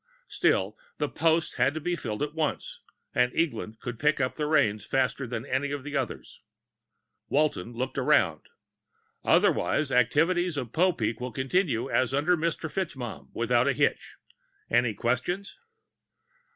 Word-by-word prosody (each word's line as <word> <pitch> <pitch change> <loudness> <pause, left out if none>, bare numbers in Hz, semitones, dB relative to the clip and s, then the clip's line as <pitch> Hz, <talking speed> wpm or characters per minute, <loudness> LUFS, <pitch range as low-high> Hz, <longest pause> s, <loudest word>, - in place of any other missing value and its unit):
Still, - - +1 0.2
the - - 0
post 165 0 +1
had 140 +3 +2
to - - -2
be 175 +3 -1
filled 110 -6 -4
at 150 0 -3
once, 160 -2 -2 0.3
and 125 0 +3
Eglin 125 -9 -2
could 120 -2 -6
pick 150 +1 +2
up 130 -1 0
the 150 -1 -2
reins 135 -10 +2
faster 135 0 0
than 115 -1 -4
any 140 +2 -1
of 145 -2 -4
the 145 0 -6
others. - - -4 0.9
Walton 140 -7 0
looked 130 +3 -3
around. 125 - +3 0.8
"Otherwise, 145 -3 +2
activities 160 +8 +2
of 120 -5 -4
Popeek 155 - +1
will 125 0 -4
continue 130 - 0
as 130 0 +1
under 155 +6 +3
Mr. 165 0 -2
FitzMaugham, 125 - -5
without 120 +2 +2
a 140 - +3
hitch. - - 0 0.6
Any 120 -2 +2
questions?" 130 - -2
135 Hz, 145 wpm, -27 LUFS, 120-155 Hz, 0.9 s, and